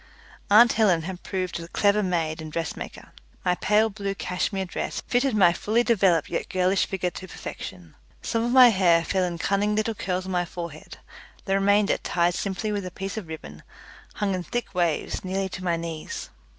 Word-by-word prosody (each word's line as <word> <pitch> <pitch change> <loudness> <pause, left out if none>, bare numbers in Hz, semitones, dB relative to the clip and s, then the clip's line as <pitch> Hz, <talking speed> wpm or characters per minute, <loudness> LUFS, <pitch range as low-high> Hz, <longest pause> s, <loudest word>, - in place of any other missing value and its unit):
Aunt 225 +3 +7
Helen 190 -7 +3
had 185 +1 -6
proved 185 -3 -3
a 165 - -8
clever 205 +4 +2
maid 165 -4 -1
and 155 -1 -7
dressmaker. 165 0 -5 0.3
My 180 - +3
pale 210 +4 +3
blue 200 -1 -4
cashmere 190 +1 -2
dress 180 - -4
fitted 245 -1 +1
my 180 -4 +5
fully 220 +7 +1
developed 190 -9 +3
yet - - -3
girlish 185 +1 +2
figure 180 -2 -2
to 185 - -8
perfection. 90 - -8 0.3
Some 230 0 0
of 240 - 0
my 255 -1 +9
hair 175 -5 +4
fell 190 -1 +1
in 175 -1 -2
cunning 200 +4 +1
little 215 +1 0
curls 185 -2 -3
on 190 - -5
my 180 -1 +1
forehead; 170 -3 -8 0.5
the 195 - 0
remainder, 200 +1 +3
tied 175 0 +1
simply 195 +3 -2
with 200 -3 -2
a - - -4
piece 195 +2 -6
of 215 -6 -5
ribbon, 75 - -9 0.5
hung 200 -2 0
in 185 - -2
thick 240 +6 -4
waves 170 -4 -1
nearly 190 +1 -2
to 185 +1 -7
my 170 -2 +1
knees. 165 -2 -6
185 Hz, 190 wpm, -25 LUFS, 175-205 Hz, 0.5 s, my